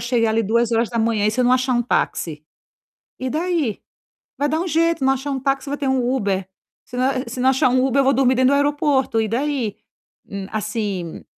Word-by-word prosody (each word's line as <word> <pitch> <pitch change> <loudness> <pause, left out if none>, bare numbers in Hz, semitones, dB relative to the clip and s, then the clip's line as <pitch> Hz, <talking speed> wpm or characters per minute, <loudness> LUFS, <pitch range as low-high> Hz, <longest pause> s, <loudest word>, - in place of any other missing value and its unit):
chegar 235 -2 +1
ali 225 +1 +1
2:00 230 -1 +1
e - - +3
se 250 +3 0
não 250 +1 +3
achar 255 0 +2
um 240 -1 +2
táxi? 155 -9 -2 0.8
E 260 0 -2
daí? 315 - -1 0.6
Vai 290 - +1
dar 315 +2 0
um 365 - -3
jeito, 330 -2 +1
não 265 0 +4
achar 275 +2 -4
um 270 - -2
táxi 275 +1 -1
vai 285 - -2
ter 280 - -2
um 260 -2 +1
Uber, 195 -6 -1 0.4
se 245 - -10
não 255 +1 +2 0.2
se 250 +2 -6
não 260 +1 +4
achar 260 -1 +3
um 255 +1 +2
Uber 270 +1 +1
eu - - +4
vou 270 +1 +3
dormir 260 -1 +3
dentro 260 +2 +3
do - - +4
aeroporto. 285 -4 +1
E 220 - -1
daí? 250 -2 -1 0.5
Hum, 200 -1 -6
assim, 210 -5 -3
255 Hz, 210 wpm, -21 LUFS, 225-275 Hz, 0.8 s, não